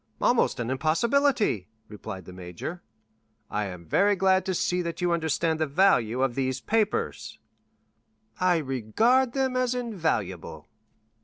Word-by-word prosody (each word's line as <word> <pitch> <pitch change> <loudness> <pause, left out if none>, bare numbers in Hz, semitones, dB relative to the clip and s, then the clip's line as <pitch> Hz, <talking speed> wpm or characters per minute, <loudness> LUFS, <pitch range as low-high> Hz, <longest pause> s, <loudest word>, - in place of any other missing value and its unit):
"Almost - - +2
an 120 +1 -2
impossibility," 205 - +1 0.2
replied 100 -3 -8
the 90 - -11
major. 90 - -7 0.7
"I 105 0 -1
am 90 -2 -9
very 200 - +3
glad 190 0 +2
to 190 - 0
see 180 +1 0
that 170 -1 -5
you 175 -1 +1
understand 160 -1 0
the 155 - +1
value 135 - +3
of 135 -2 +1
these 130 0 -1
papers." 215 +6 -1 1.0
"I 180 -1 +3
regard 165 - +1
them 265 -2 0
as 255 -1 +1
invaluable." 110 - -3
160 Hz, 135 wpm, -26 LUFS, -, 1.0 s, very